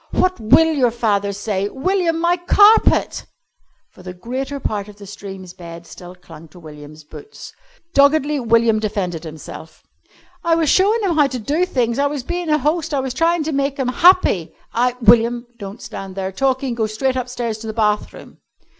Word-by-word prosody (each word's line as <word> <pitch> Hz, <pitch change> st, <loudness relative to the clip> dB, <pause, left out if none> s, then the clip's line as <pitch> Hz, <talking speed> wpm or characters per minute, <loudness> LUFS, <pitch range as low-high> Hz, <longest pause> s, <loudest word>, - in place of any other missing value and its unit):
"What 370 Hz, -4 st, 0 dB
will 320 Hz, +9 st, +4 dB
your 260 Hz, -5 st, +2 dB
father 210 Hz, -4 st, -1 dB
say?" 200 Hz, 0 st, -3 dB
"William, 340 Hz, -, -1 dB
my 345 Hz, +1 st, +2 dB
carpet!" 410 Hz, +5 st, +3 dB, 0.6 s
For -, -, -17 dB
the 180 Hz, 0 st, -9 dB
greater 260 Hz, +8 st, -5 dB
part 210 Hz, -5 st, -3 dB
of 210 Hz, -, -13 dB
the 205 Hz, 0 st, -13 dB
stream's 190 Hz, -2 st, -10 dB
bed 170 Hz, -1 st, -11 dB
still 180 Hz, +1 st, -12 dB
clung 165 Hz, -3 st, -14 dB
to 170 Hz, +4 st, -17 dB
William's 155 Hz, -1 st, -12 dB
boots. 420 Hz, -, -12 dB, 0.4 s
Doggedly 285 Hz, +1 st, +3 dB
William 230 Hz, -2 st, +2 dB
defended 185 Hz, -6 st, -3 dB
himself. 160 Hz, 0 st, -11 dB, 0.6 s
"I 335 Hz, -1 st, +2 dB
was 325 Hz, -3 st, +1 dB
showin' 420 Hz, +4 st, +3 dB
'em 350 Hz, -5 st, 0 dB
how 295 Hz, -2 st, +4 dB
to 260 Hz, -2 st, -5 dB
do 295 Hz, +10 st, -1 dB
things. 240 Hz, -6 st, -1 dB
I 285 Hz, -, +2 dB
was 285 Hz, -2 st, -4 dB
bein' 350 Hz, +3 st, -4 dB
a 305 Hz, -, +3 dB
host. 300 Hz, +1 st, -1 dB
I -, -, +1 dB
was 265 Hz, -1 st, -3 dB
tryin' 330 Hz, +3 st, +1 dB
to 315 Hz, -, -3 dB
make 275 Hz, -1 st, -1 dB
'em 260 Hz, -2 st, 0 dB
happy! 255 Hz, -, +3 dB, 0.2 s
I 245 Hz, +1 st, +1 dB
" -, -, -27 dB
"William, 235 Hz, +2 st, +4 dB
don't 200 Hz, +2 st, -9 dB
stand 195 Hz, -1 st, -8 dB
there 190 Hz, -1 st, -4 dB
talking. 260 Hz, +4 st, -1 dB
Go 225 Hz, -2 st, -1 dB
straight 255 Hz, +5 st, -2 dB
upstairs 245 Hz, -3 st, -4 dB
to 220 Hz, -, -8 dB
the -, -, -3 dB
bathroom." 210 Hz, -2 st, -2 dB
240 Hz, 185 wpm, -19 LUFS, 200-295 Hz, 0.6 s, will